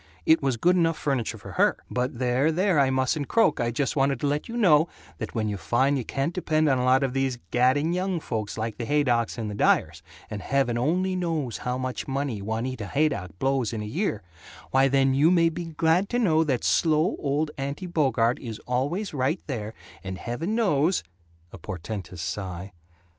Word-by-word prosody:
it 160 - +5
was 135 -4 0
good 180 +10 +3
enough 165 -2 +2
furniture 135 -6 -1
for - - -10
her. - - +2
But 125 0 -2
there, 130 +5 +2
there, 180 -1 +2
I 135 -1 +4
mustn't 130 +2 0
croak, 225 -10 +3
I 120 - +1
just 135 +5 -1
wanted 135 -1 +1
to - - 0
let 145 +8 -2
you 235 - -4
know 165 -7 +4 0.3
that - - -6
when 110 -2 0
you 105 -1 -2
find 125 +10 +1
you 130 - -1
can't 135 +8 -2
depend 155 -3 +1
on 135 -3 +3
a - - 0
lot 130 +2 +4
of 130 -2 -1
these 135 -2 0
gadding 130 +7 +2
young 185 -1 -1
folks 110 -8 -4
like 110 0 -4
the 120 - -2
Haydocks 125 -7 +1
and 115 -2 -3
the 105 - -4
Dyers 100 - +2 0.3
and 105 -1 -6
heaven 135 -3 0
only 180 +10 0
knows 160 - -2
how 125 0 -2
much 130 -1 -4
money 135 -6 -2
Juanita 110 +1 -3
Haydock 100 - -1
blows 130 -1 0
in 110 -2 -3
in 105 - -6
a - - -9
year 150 - -1 0.5
why 135 +1 +4
then 135 0 +3
you 145 +4 +4
may 170 -2 +4
be 170 +1 -5
glad 165 +4 +1
to 245 - 0
know 165 -9 +3
that 130 -5 -1
slow 160 +1 +2
old 150 +2 -1
Aunty 140 +6 -4
Bogart 130 -8 +1
is 115 -4 -6
always 145 - -1
right 140 +5 0
there, 110 -6 -5 0.3
and 95 -1 -5
heaven 155 - -3
knows 180 -6 +2 0.2
" 85 +1 -34
A - - -9
portentous 90 -2 -6
sigh. 95 0 -5
135 Hz, 205 wpm, -26 LUFS, 120-160 Hz, 0.5 s, it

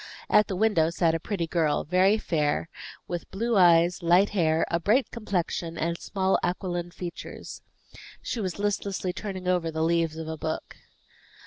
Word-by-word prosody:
At 210 0 +5
the 190 - -3
window 180 -6 +3
sat 170 -1 +1
a 165 - 0
pretty 180 -1 -2
girl, 160 -3 +1
very 185 +5 +3
fair, 155 -4 -1 0.4
with 175 -1 -5
blue 230 +4 -1
eyes, 175 -1 +5
light 175 +4 +4
hair, 165 -5 +2
a 170 - +1
bright 225 +9 +2
complexion, 180 -6 -3
and 170 +1 -1
small 190 -1 0
aquiline 175 -1 -2
features. 175 0 -8 0.6
She 230 - -4
was 185 -3 -3
listlessly 200 -2 -2
turning 190 -1 -6
over 180 -2 +1
the 160 0 -2
leaves 165 -1 +1
of 160 -1 -5
a 160 0 -4
book. 160 - -4
175 Hz, 160 wpm, -27 LUFS, 165-195 Hz, 0.6 s, At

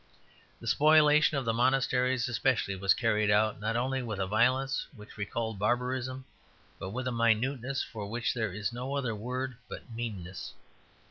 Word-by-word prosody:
The - - -11
spoliation 150 0 +5
of 135 - -2
the 115 - +1
monasteries 125 0 +2
especially 120 -4 0
was 95 0 +3
carried 105 -3 +1
out, 105 0 +3
not 110 +2 -2
only 130 +2 0
with 110 -4 -4
a 95 - +1
violence 125 +6 +1
which 105 -2 -13
recalled 110 +1 -3
barbarism, 125 +3 -1 0.5
but 95 - -5
with 130 +5 -4
a - - 0
minuteness 125 +3 +1
for 105 -3 -7
which 120 +2 -1
there 110 -4 -2
is 105 +4 -3
no 130 +3 -4
other 130 -5 -1
word 125 +3 -4
but - - -8
meanness. 100 -6 -6
120 Hz, 160 wpm, -30 LUFS, 110-130 Hz, 0.5 s, spoliation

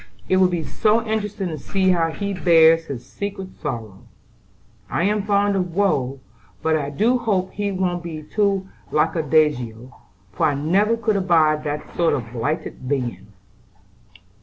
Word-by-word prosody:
"It 185 - +3
will 185 0 +5
be 175 -3 -2
so 215 +11 +1
interesting 210 -3 -2
to 155 -2 -5
see 190 +5 +1
how 165 -2 +2
he 200 +5 -3
bears 165 -3 +5
his 125 -5 -7
secret 195 +6 -6
sorrow. 115 -10 -6 0.8
I - - 0
am 210 +2 +1
fond 200 0 +2
of 180 -3 -2
woe; 140 -10 +1 0.4
but 160 0 +2
I 145 -2 -1
do 225 - +2
hope 195 -6 0
he 205 -1 -2
won't 180 -2 -1
be 160 -3 -7
too 195 +2 0 0.2
lackadaisical, 145 -7 +1 0.4
for - - +1
I 145 - 0
never 195 +10 +2
could 220 -3 0
abide 160 -5 +3
that 150 0 -5
sort 170 -1 +2
of 120 -4 -6
blighted 130 +1 -3
being." 125 -6 -2
170 Hz, 155 wpm, -22 LUFS, 145-200 Hz, 0.8 s, will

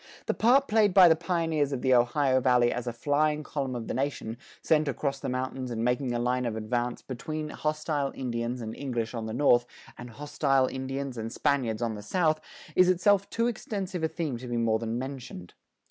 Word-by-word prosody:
The - - 0
part 265 +5 +4
played 210 -3 +3
by 185 -2 +9
the 160 - +6
pioneers 165 -4 0
of 135 -3 -3
the 130 -1 +4
Ohio 130 +2 +3
Valley 125 -2 +4
as 125 0 -4
a - - 0
flying 150 +5 0
column 135 -3 -3
of 120 -2 -4
the - - -3
nation, 130 -4 -3 0.3
sent 155 -1 +3
across 140 +1 -2
the - - -4
mountains 130 0 -3
and 115 -1 -2
making 125 +1 0
a 120 - 0
line 125 +1 0
of 110 - -3
advance 120 +2 -2
between 150 +5 -5
hostile 150 -2 -2
Indians 120 -1 -3
and 110 -1 -5
English 120 -5 -3
on 115 -2 -4
the 110 - -4
north, 120 -3 +4 0.3
and 120 0 -8
hostile 135 +1 +1
Indians 130 -1 -4
and 115 +1 -4
Spaniards 125 -6 0
on 115 -1 -1
the 105 - -7
south, 155 - +1 0.3
is 185 0 +6
itself 195 +2 +3
too 230 - 0
extensive 200 -6 -3
a - - +3
theme 160 -5 -3
to 125 +2 -8
be 120 -1 -2
more 115 -1 +2
than 115 0 -3
mentioned. 125 -9 -7
130 Hz, 205 wpm, -28 LUFS, 120-155 Hz, 0.3 s, by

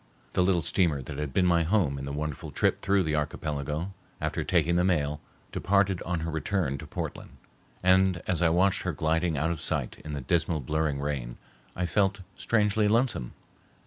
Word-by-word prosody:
The - - +2
little 90 -2 +2
steamer 75 -5 +2
that 70 - -6
had 75 -2 -3
been 90 +6 +2
my 85 -1 +4
home 80 -6 +1
in 70 - -5
the 70 - -4
wonderful 75 0 -4
trip - - +1
through 100 -1 +2
the 80 -2 -1
archipelago, 75 +3 -2 0.3
after - - -2
taking 85 +1 +2
the 90 - +3
mail, 75 -5 +1 0.3
departed 100 -1 +2
on 90 -1 -2
her 80 +1 -3
return 80 -3 -1
to - - -9
Portland, - - -6 0.5
and 95 -1 +4
as 90 -2 0
I 85 - +5
watched 95 +3 +3
her - - -2
gliding 80 0 0
out 80 +4 +1
of 85 - -4
sight - - -2
in 75 - -6
the 70 - -3
dismal 85 +3 +1
blurring 75 +1 -1
rain, 70 -4 -3 0.4
I 90 - -1
felt 100 +1 +1
strangely 105 -1 +2
lonesome. 115 - +1
85 Hz, 185 wpm, -28 LUFS, 75-95 Hz, 0.5 s, I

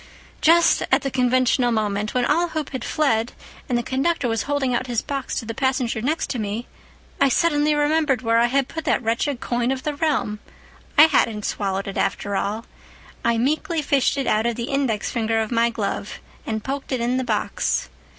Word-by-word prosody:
"Just 335 +1 +5
at - - +3
the 275 - -2
conventional 250 -1 +2
moment, 210 -1 -1
when 250 -1 +2
all 340 +6 +2
hope 310 -3 -4
had 260 -3 -4
fled, 240 -6 0 0.4
and 245 - +2
the 240 - -1
conductor 270 +2 0
was 225 -1 0
holding 280 -3 +1
out 255 +1 -1
his 240 -2 -1
box 275 -2 -4
to 230 - -3
the 230 - -4
passenger 255 -3 0
next 300 +7 -1
to 250 - -3
me, 215 +3 -3 0.6
I 275 - +5
suddenly 300 0 +2
remembered 295 -3 +1
where 230 0 +3
I 235 - +4
had 270 +1 +1
put 320 +2 -6
that - - +1
wretched 235 +4 0
coin 240 0 -1
of 265 -1 -3
the 300 - -1
realm. 285 -8 -1 0.6
I 300 - +10
hadn't 225 -9 +2
swallowed 195 -1 -2
it 195 - -5
after 200 -1 -1
all. 210 +4 -2 0.6
I 235 0 +2
meekly 305 +6 0
fished 280 -1 +2
it 275 - -1
out 215 +2 +2
of 235 - -1
the 235 +5 -4
index 265 -7 0
finger 225 -1 0
of 220 +1 -2
my 235 0 +3
glove 210 -2 -4 0.3
and 220 -1 -2
poked 275 +1 -4
it 260 - 0
in 240 +2 0
the 260 - 0
box. - - -1
250 Hz, 200 wpm, -22 LUFS, 225-280 Hz, 0.6 s, I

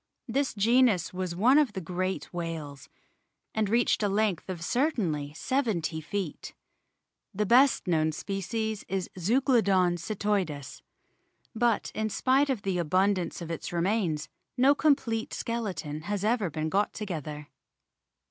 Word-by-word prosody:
This 265 +2 0
genus 220 -4 +3
was 180 -2 -3
one 250 +10 +5
of 275 -8 +2
the 190 - -3
great 185 +2 -3
whales, 160 -5 -5 0.6
and 215 -2 0
reached 235 +1 +2
a 205 - +2
length 200 -3 0
of 175 -3 -4
certainly 180 - 0
seventy 205 - -1
feet. 185 0 -5 0.8
The 210 +2 +1
best 250 +5 +5
known 160 -3 +2
species 200 +5 -3
is 190 -1 -3
Zeuglodon 200 -5 +3
cetoides. 185 -6 -2 0.7
But 235 -1 +1
in 220 0 -1
spite 265 +6 +2
of 250 -7 -1
the 190 -2 -1
abundance 185 +2 +1
of 165 - -6
its 165 - -5
remains 170 -4 0 0.3
no 265 +3 +6
complete 260 -7 +1
skeleton 195 -10 -3
has 205 +3 -3
ever 220 -4 +1
been 155 +1 -3
got 200 +4 +1
too 215 - -5
ether. 150 -4 -6
195 Hz, 135 wpm, -28 LUFS, 170-230 Hz, 0.8 s, no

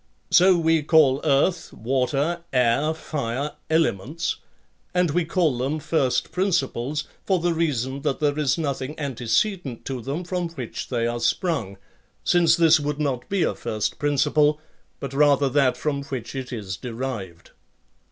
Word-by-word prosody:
So 180 +1 +6
we 165 -1 +2
call 145 -3 +4
earth, 160 +4 +1
water, 135 +8 -1
air, 125 +4 +2
fire, 140 -2 -3 0.2
elements; 160 - 0 0.6
and 180 -3 +2
we 175 +2 +1
call 165 -4 +1
them 135 +5 -1
first 140 -4 0
principles 155 -6 0 0.2
for 190 - +2
the 175 0 0
reason 140 -5 -1
that 135 - -1
there 150 0 +1
is 145 -1 +1
nothing 140 -2 -3
antecedent 135 - -1
to 130 -2 -4
them 140 +9 -4
from 180 -1 -2
which 130 -8 -6
they 120 -2 0
are 120 0 -1
sprung, 120 - -1 0.5
since 175 -1 +4
this 165 -2 +5
would 145 0 -3
not 130 -4 -2
be 195 -2 +1
a - - +1
first 110 -1 -3
principle, 145 +1 +2 0.4
but 135 -1 -6
rather 140 -1 +4
that 130 -2 +2
from 140 -1 -2
which 130 -6 -6
it 130 -1 -5
is 100 -6 -5
derived. 115 -8 -6
145 Hz, 150 wpm, -24 LUFS, 125-160 Hz, 0.6 s, So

